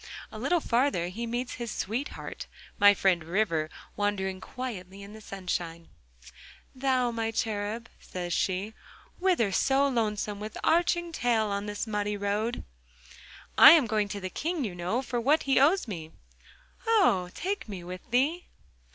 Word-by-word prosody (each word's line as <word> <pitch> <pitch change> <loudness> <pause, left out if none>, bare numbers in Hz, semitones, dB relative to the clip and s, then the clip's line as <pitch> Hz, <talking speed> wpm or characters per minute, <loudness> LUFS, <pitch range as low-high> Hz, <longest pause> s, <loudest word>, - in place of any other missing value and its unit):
A - - -8
little 350 - +2
farther 240 - +1
he 230 +6 -5
meets 240 +2 -3
his 235 - -3
sweetheart, 230 +7 -4 0.3
my 205 0 +7
friend 185 -5 +2
River, 165 -3 0 0.3
wandering 190 -2 -1
quietly 200 -7 -7
in 200 +1 -11
the 220 - -11
sunshine. 175 -4 -4 0.8
'Thou, 255 -2 +1
my 225 -1 -2
cherub,' 220 +1 -2
says 175 -1 -5
she, 195 +3 -1 0.5
'whither 350 - +2
so 275 +7 +3
lonesome, 210 -5 -1
with 215 +1 -6
arching 345 +1 +2
tail, 235 -7 +1
on 200 +1 -2
this 205 +1 -3
muddy 210 -1 -2
road?' 205 +4 -1 1.0
'I - - +12
am 315 -6 +5
going 215 -2 0
to 200 0 -5
the 185 -1 -5
King, 330 - -2
you 205 -6 -3
know, 180 +9 -2
for 240 -1 -2
what 295 +6 +3
he 270 -2 +3
owes 315 +4 +4
me.' 165 -7 -6 0.8
'Oh! 245 - +3
take 390 - -3
me 190 -4 -6
with 180 +1 -7
thee! 285 +9 +1
215 Hz, 150 wpm, -28 LUFS, 195-255 Hz, 1.0 s, I